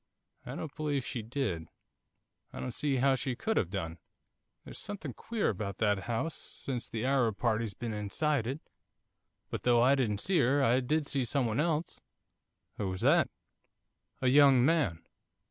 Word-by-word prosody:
'I - - -5
don't 155 -3 -6
believe 145 -4 -1
she 120 - -3
did, 110 - -3 0.8
I - - -8
don't 125 - -4
see 140 +1 0
how 135 +1 +3
she 130 0 -1
could 220 - -1
have 85 - +1
done, 85 -4 -4 0.7
there's - - -9
something 190 -10 -5
queer 225 - -1
about 100 -1 -3
that 105 -3 +1
house, 120 +8 -1
since 125 -3 -6
that 110 0 -3
Arab 125 -6 +2
party's 110 -1 0
been 115 +2 -4
inside 110 +5 0
it. 135 +5 -3 0.9
But - - -3
though 120 -1 +4
I 130 +2 +6
didn't 120 -7 +1
see 180 - +1
her, 135 +2 +3
I 125 +1 +4
did 150 +4 0
see 140 -2 0
someone 120 -2 0
else.' 160 +1 -1 0.8
'Who 100 - -2
was 95 0 -4
that?' - - +4 0.9
'A 130 - +4
young 135 -2 +6
man. 140 - +1
125 Hz, 165 wpm, -31 LUFS, 110-145 Hz, 0.9 s, I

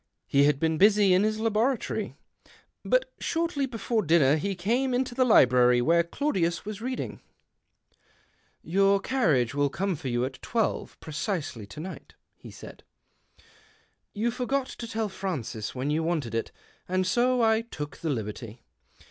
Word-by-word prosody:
He 140 0 +3
had 145 -2 +2
been 160 0 0
busy 205 -1 +5
in 185 - +4
his 215 +1 0
laboratory. 225 +3 -1 0.7
But - - +1
shortly 330 -4 -1
before 225 -2 -1
dinner 155 -5 +4
he 195 +5 -2
came 245 +8 0
into 255 0 -1
the 255 +1 +2
library 125 - +5
where 165 +7 +4
Claudius 170 - -1
was 210 0 -6
reading. 255 +2 -4 0.7
" - - -38 0.7
Your 195 +3 +3
carriage 165 - +1
will 145 0 +1
come 190 +5 -2
for 140 - -7
you 120 0 0
at 130 0 -8
twelve 225 -3 -2
precisely 155 - -4
to 100 - -10
night," 185 +4 -9 0.2
he - - -13
said. - - -12 0.7
" - - -32
You 235 - +2
forgot 255 +2 -1
to 235 - -7
tell 225 -1 -2
Francis 145 - -5
when 130 +3 -2
you 155 +2 +1
wanted 160 -9 -2
it, 115 - -2 0.4
and 185 +1 0
so 245 +5 +2
I 220 0 +3
took 150 -10 -7
the 165 - -4
liberty. 110 -2 -5
185 Hz, 155 wpm, -27 LUFS, 145-230 Hz, 0.7 s, busy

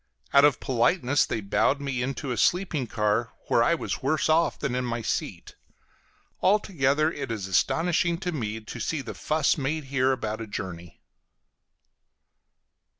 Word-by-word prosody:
Out 140 - +7
of 145 -3 +3
politeness 130 +3 +2
they 110 - -2
bowed 105 +7 +1
me 135 -3 -3
into 135 +1 -3
a - - -1
sleeping 175 - +1
car, 105 +1 0 0.2
where - - +4
I 170 +8 +3
was - - -4
worse 155 +4 0
off 165 +2 +3
than 135 - -2
in 125 0 -1
my 120 -1 -3
seat. - - -3 0.9
Altogether, 155 -7 +2
it 135 - -5
is 110 -4 -3
astonishing 170 - +1
to 180 - -2
me 110 -7 -4
to 115 +2 -8
see 145 +6 -2
the 120 - -6
fuss 155 0 +1
made 150 +3 -2
here 130 0 +3
about 110 -4 -3
a 115 - -6
journey. 85 -6 -7
135 Hz, 155 wpm, -26 LUFS, 115-155 Hz, 0.9 s, Out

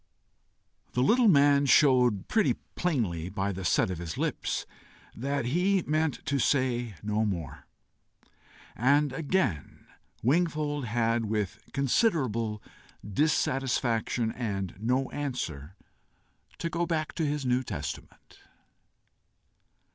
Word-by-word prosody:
The 125 - +2
little 235 - +4
man 140 -4 +5
showed 125 -7 +4
pretty 220 -2 +2 0.2
plainly 105 - -1
by 100 0 -2
the 95 0 -6
set 90 - +2
of 90 - -5
his 85 -2 -5
lips - - -2 0.5
that 140 +2 -2
he 180 +7 +2
meant 155 -1 -1
to 140 -1 0
say 125 -5 +1
no 105 +1 0
more, 80 - -4 1.1
and 140 +3 +3
again 145 - -1 0.4
Wingfold 150 0 +1
had, 115 0 0
with 105 -2 -2
considerable 125 - 0 0.4
dissatisfaction 120 -2 0
and 100 -7 -3
no 125 +4 0
answer, 95 - -4 0.8
to - - -3
go 170 0 -1
back 160 -2 -2
to 165 - -2
his 145 -2 -1
New 125 0 +2
Testament. 130 - -7
125 Hz, 110 wpm, -28 LUFS, 105-145 Hz, 1.1 s, man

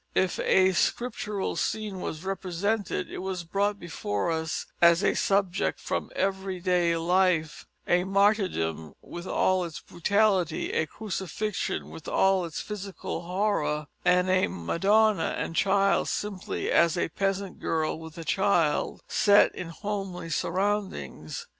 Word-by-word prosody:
If 185 -1 +1
a 190 0 +4
scriptural 210 0 -1
scene 210 -4 -2
was 155 +3 -5
represented 195 +1 -2
it - - -5
was 185 -2 -3
brought 200 +4 0
before 105 -8 -2
us 160 0 -2 0.2
as 170 +2 +6
a - - +3
subject 195 -2 +1
from - - -3
everyday 185 -3 0
life; 170 -2 +1 0.2
a 175 0 +3
martyrdom 185 - +1
with 175 +1 -8
all 185 -1 +2
its 165 -3 -6
brutality, 190 -2 +1
a 160 - +1
crucifixion 190 - -3
with 80 - -10
all 190 -2 +3
its 165 - -5
physical 200 -2 -5
horror, 175 -5 0 0.2
and 180 0 +3
a 185 0 +3
madonna 195 - +2
and 165 - -3
child 195 +1 +3
simply 205 -3 -3
as 170 +1 +4
a 170 - 0
peasant 195 +2 -2
girl 160 -1 -1
with 160 0 -10
a 165 - -6
child, 175 -6 +1
set 205 -1 +5
in 180 - -6
homely 195 -2 -5
surroundings. 200 - -2
185 Hz, 130 wpm, -27 LUFS, 170-200 Hz, 0.2 s, as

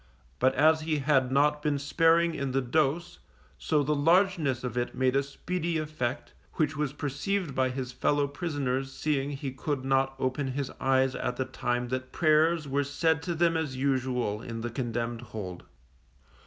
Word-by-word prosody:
But 130 +1 +3
as 155 +2 +4
he 155 -1 0
had 135 -3 +2
not 150 +2 +3
been 150 -1 0
sparing 165 +4 +3
in 140 -3 -3
the 135 - +3
dose, 145 - 0 0.4
so 150 -2 +1
the 150 +2 +1
largeness 160 -4 +2
of 125 -2 -4
it 120 0 -2
made 130 0 +1
a 140 - +4
speedy 165 +4 -3
effect, 150 -4 -3 0.2
which 155 -1 0
was 150 -2 -1
perceived 150 +4 -2
by 130 0 +1
his 130 -1 -4
fellow 145 +3 +1
prisoners 140 -4 -2
seeing 140 -1 -1
he 140 -1 -4
could 135 0 -3
not 135 0 +2
open 130 +1 -1
his 140 -1 -3
eyes 130 0 +2
at 125 - -2
the 130 - -1
time 125 -1 -2
that 130 0 -3
prayers 155 0 +3
were 140 +1 +1
said 145 +2 +1
to 170 0 -3
them 165 0 +2
as 155 -5 -2
usual 130 -5 0
in 115 -1 -6
the 120 0 -4
condemned 120 -1 -3
hold. 100 -6 -7
140 Hz, 175 wpm, -28 LUFS, 130-155 Hz, 0.4 s, as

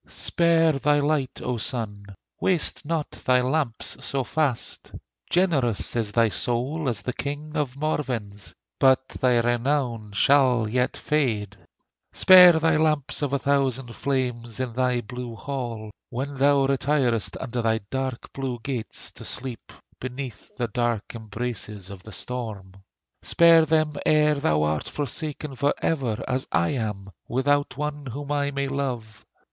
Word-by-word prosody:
Spare 165 -1 +3
thy 145 +1 +3
light, 145 -3 -1
O 125 -1 -1
Sun! 105 -4 -3 0.3
Waste 180 -4 +1
not 160 -1 -2
thy 125 0 +2
lamps 130 -1 -1
so 135 +2 -1
fast. 140 -3 -2 0.4
Generous 145 - +1
is 110 -3 0
thy 115 +1 +4
soul 130 - 0
as 105 -5 -1
the 125 - -3
King 145 +4 -5
of 140 -4 -2
Morven's: 120 -9 -3 0.3
But 130 -1 +4
thy 125 -2 +1
renown 120 -3 -1
shall 125 0 +4
yet 125 +3 0
fade; 110 -10 -1 0.6
Spare 180 -2 +9
thy 160 -1 +2
lamps 155 -3 +1
of 145 -2 -1
a 140 - +2
thousand 135 -3 0
flames 125 -4 -2
In 130 -3 -2
thy 125 0 +1
blue 125 0 -7
hall, 115 -3 -5 0.2
when 135 +4 -4
thou 140 0 +4
retirest 135 -4 0
Under 125 -2 -3
thy 110 -1 +1
dark 130 -2 -4
blue 135 -3 -3
gates 125 -4 -3
to - - -11
sleep, 125 -3 -5 0.3
Beneath 130 -1 -7
the 120 - -1
dark 120 -2 -1
embraces 110 -3 -5
of 95 -2 -9
the 110 - -12
storm. 110 -5 -5 0.5
Spare 165 -1 +5
them, 155 -1 +2
ere 150 0 +4
thou 75 - +1
art 75 0 -1
forsaken 150 0 -3
for 140 +2 +1
ever, 125 -8 -1
As 130 0 -1
I 85 +1 +2
am, 105 -6 -3 0.2
without 145 +2 +1
one 150 -1 -4
whom 140 +4 -6
I 145 -1 +1
may 140 0 -2
love! 125 -6 -4
130 Hz, 145 wpm, -25 LUFS, 115-145 Hz, 0.6 s, Spare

